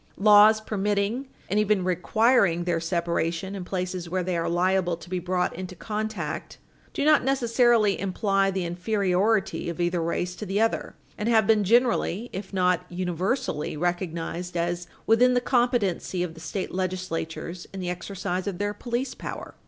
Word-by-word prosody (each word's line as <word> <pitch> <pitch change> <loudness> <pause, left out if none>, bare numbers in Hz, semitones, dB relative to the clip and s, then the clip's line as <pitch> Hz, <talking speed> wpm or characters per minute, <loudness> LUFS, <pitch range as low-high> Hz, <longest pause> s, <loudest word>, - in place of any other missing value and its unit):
Laws 210 +1 +7
permitting, 210 +4 -1 0.2
and 205 +3 +1
even 210 -2 +2
requiring, 185 0 +2
their 170 -1 0
separation 170 +2 -1
in 195 -2 -5
places 180 -1 -4
where 185 +1 -1
they 180 0 -1
are 165 0 -1
liable 180 0 +1
to 175 - -13
be 185 - 0
brought 180 0 -1
into 185 +1 -6
contact 210 -6 -4 0.3
do 285 - -2
not 305 -1 +5
necessarily 240 -5 +3
imply 195 0 +1
the 190 -2 -2
inferiority 190 +2 0
of 170 - -6
either 175 0 +1
race 175 +2 -2
to 215 - -5
the 195 +2 0
other, 225 +1 0 0.2
and 210 +2 0
have 220 -2 +4
been 215 0 +4
generally, 235 -1 +2
if 190 +1 -6
not 180 -2 +2
universally, 180 - -2
recognized 175 +1 -3
as 175 +1 -2 0.2
within 250 +3 +4
the - - +4
competency 240 -8 +1
of 170 -2 -4
the 165 - -13
state 165 +4 -4
legislatures 180 -2 -4
in 195 - -7
the 180 -1 -2
exercise 185 +1 -4
of 195 -3 -3
their 205 +1 -1
police 245 +3 -3
power. - - -7
185 Hz, 160 wpm, -26 LUFS, 175-215 Hz, 0.3 s, Laws